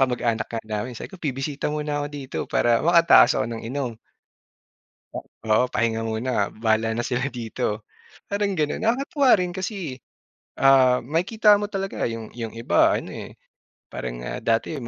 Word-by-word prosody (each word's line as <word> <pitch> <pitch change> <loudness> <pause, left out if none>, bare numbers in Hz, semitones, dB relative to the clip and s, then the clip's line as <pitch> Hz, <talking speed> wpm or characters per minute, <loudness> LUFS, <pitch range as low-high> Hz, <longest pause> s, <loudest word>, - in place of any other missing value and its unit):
kamag-anak 120 -3 0
nga 115 -1 -4
namin 110 +3 -4
sabi - - -8
ko 190 - -12
"Bibisita 140 0 -3
muna 150 -1 -2
ako 145 - -2
dito," 135 -1 -7
para 120 -1 +2
makatakas 170 0 +6
ako 110 - +1
ng 115 0 -5
inom. 130 -2 -3 1.2
'Pag - - -6 0.2
oo, 110 +4 +5
pahinga 115 -1 +1
muna, 110 -1 -1
bahala 110 0 +1
na 120 - -1
sila 125 +2 -1
dito. 115 -4 -3 0.5
Parang 200 -1 0
gano'n 150 -3 -1
nakakatuwa 270 +4 +1
rin 180 -1 -1
kasi, 185 - -5 0.6
ah, 130 -3 +5
makikita 205 - +3
mo 205 - -3
talaga 195 - -3
'yong 115 -1 -7
'yong 115 -2 -6
iba 115 - +3
ano, - - -6
eh, - - -9 0.6
parang, - - -5
ah, - - -4
dati 115 +5 0
'yong 125 -6 -6
130 Hz, 160 wpm, -24 LUFS, 115-170 Hz, 1.2 s, makatakas